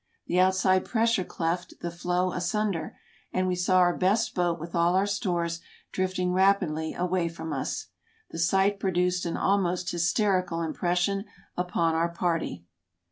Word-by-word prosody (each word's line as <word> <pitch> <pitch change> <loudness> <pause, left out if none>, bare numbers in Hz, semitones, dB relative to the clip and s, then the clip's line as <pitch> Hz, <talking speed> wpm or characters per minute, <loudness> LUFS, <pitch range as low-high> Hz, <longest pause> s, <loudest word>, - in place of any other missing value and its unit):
The 180 - +1
outside 190 0 +3
pressure 230 -4 +1
cleft 175 +1 -3
the 170 - -3
floe 180 +1 -1
asunder, 180 -1 -2 0.3
and 185 - 0
we 185 - +1
saw 180 +1 +2
our 175 -1 +4
best 200 +5 +1
boat 175 -2 0
with 165 +2 -8
all 170 +1 +3
our 190 +1 +3
stores 175 -4 -1 0.3
drifting 185 -1 -1
rapidly 180 -5 +2
away 180 -1 0
from 165 -1 -6
us. 135 - -3 0.4
The - - -6
sight 195 +4 +2
produced 180 -2 0
an 165 - -2
almost 185 -2 +1
hysterical 180 -1 +1
impression 180 +5 0 0.3
upon 175 -2 0
our 165 +1 +1
party. 165 - -2
180 Hz, 145 wpm, -27 LUFS, 170-190 Hz, 0.4 s, our